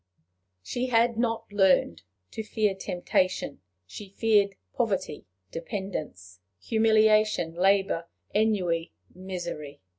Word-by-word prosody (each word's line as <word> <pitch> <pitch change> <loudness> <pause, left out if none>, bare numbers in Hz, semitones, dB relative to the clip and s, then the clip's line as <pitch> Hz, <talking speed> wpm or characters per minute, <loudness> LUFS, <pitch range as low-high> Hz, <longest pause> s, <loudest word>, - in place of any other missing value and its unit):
She 245 - -2
had 235 -1 +3
not 225 -1 -1
learned 185 - +3 0.3
to - - -4
fear 215 -1 0
temptation; 185 - -1 0.2
she 200 - -10
feared 200 -1 +2 0.2
poverty, 200 - -2 0.2
dependence, 165 - -6 0.2
humiliation, 215 - +3
labor, 190 -1 +2 0.3
ennui, 185 -6 +1 0.2
misery. 175 -6 -6
195 Hz, 90 wpm, -27 LUFS, 170-220 Hz, 0.3 s, had